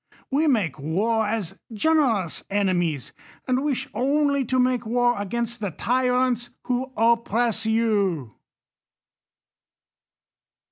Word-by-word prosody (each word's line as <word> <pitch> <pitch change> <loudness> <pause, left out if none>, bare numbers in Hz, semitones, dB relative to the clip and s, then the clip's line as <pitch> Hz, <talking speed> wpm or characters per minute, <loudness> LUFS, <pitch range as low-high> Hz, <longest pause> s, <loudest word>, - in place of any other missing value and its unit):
We 300 +4 +2
make 190 - +1
war 210 +9 0
as 210 -5 -3
generous 230 - +1
enemies; 175 -8 0 0.3
and 255 +1 +1
wish 290 -4 -1
only 280 +1 +1
to 255 +3 0
make 255 -1 +2
war 240 +2 +2
against 235 +3 -3
the 205 -2 -2
tyrants 250 +4 0
who 255 +1 -2
oppress 230 0 +1
you. 200 - +1
230 Hz, 100 wpm, -24 LUFS, 205-255 Hz, 0.3 s, We